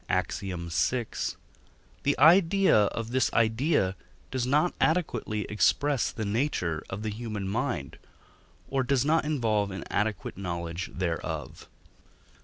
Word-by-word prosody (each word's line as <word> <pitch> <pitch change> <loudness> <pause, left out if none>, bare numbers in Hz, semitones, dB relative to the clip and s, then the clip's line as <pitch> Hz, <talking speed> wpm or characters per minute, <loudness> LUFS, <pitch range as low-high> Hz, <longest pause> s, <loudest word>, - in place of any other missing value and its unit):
Ax. - - 0
vi) 95 -1 -5 1.5
the 145 - +1
idea 170 - +6
of 115 +3 -4
this 130 +1 +2
idea 115 - +2 0.4
does 130 -2 -1
not 150 +6 +2
adequately 125 -10 0
express 135 +7 +1
the 110 - -4
nature 100 - -1
of 100 +3 -5
the 110 - -2
human 105 -3 -4
mind, 105 - -2 0.7
or 135 -1 0
does 130 0 +1
not 160 +1 +2
involve 110 -9 +1
an 95 0 -6
adequate 105 -3 -2
knowledge 85 -1 -4
thereof. 85 -3 -4
115 Hz, 120 wpm, -28 LUFS, 100-140 Hz, 1.5 s, idea